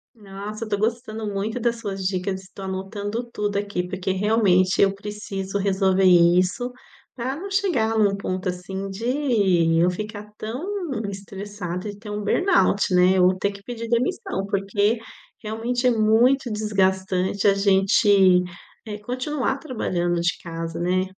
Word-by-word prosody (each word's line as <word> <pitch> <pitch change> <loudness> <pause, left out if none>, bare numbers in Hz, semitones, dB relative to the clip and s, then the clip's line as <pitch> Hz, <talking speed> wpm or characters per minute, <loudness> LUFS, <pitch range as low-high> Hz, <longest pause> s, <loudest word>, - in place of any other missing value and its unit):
Nossa! 210 +1 -7
Eu 215 - -10
tô 205 - 0
gostando 220 0 -2
muito 215 +4 -2
das 235 0 0
suas 195 -4 -5
dicas, 190 0 -2
tô 195 - -9
anotando 200 +4 -4
tudo 205 -2 -2
aqui. 200 -3 -2
Porque, 190 +1 -3
realmente, 190 -2 +3
eu 195 -1 +4
preciso 200 -1 -5
resolver 195 -1 +2
isso, 180 +6 +4 0.4
pra 255 +2 -3
não 395 +4 -6
chegar 350 - +1
num 205 -2 +3
ponto, 185 -1 -3
assim, 190 +2 -5
de 200 - +1
eu 175 +2 +4
ficar 210 +2 -6
tão 240 +9 -5 0.4
estressada 195 -1 -6
e 205 -1 -7
ter 210 0 -10
um 210 0 -4
burnout, 210 - +2
né, 180 +1 +5
ou 185 +1 +4
ter 200 +1 0
que 200 0 -13
pedir 230 0 -6
demissão. 250 - -1
Porque, 205 +3 +1 0.4
realmente, 235 +4 -1
é - - +5
muito 235 +3 +3
desgastante 190 -2 0
a 200 - +6
gente 195 -1 +4 0.4
eh 210 -1 -5
continuar 260 +4 -2
trabalhando 175 - -1
de 170 +2 0
casa, 165 -1 -5
né? 180 +2 +1
200 Hz, 145 wpm, -23 LUFS, 190-225 Hz, 0.4 s, a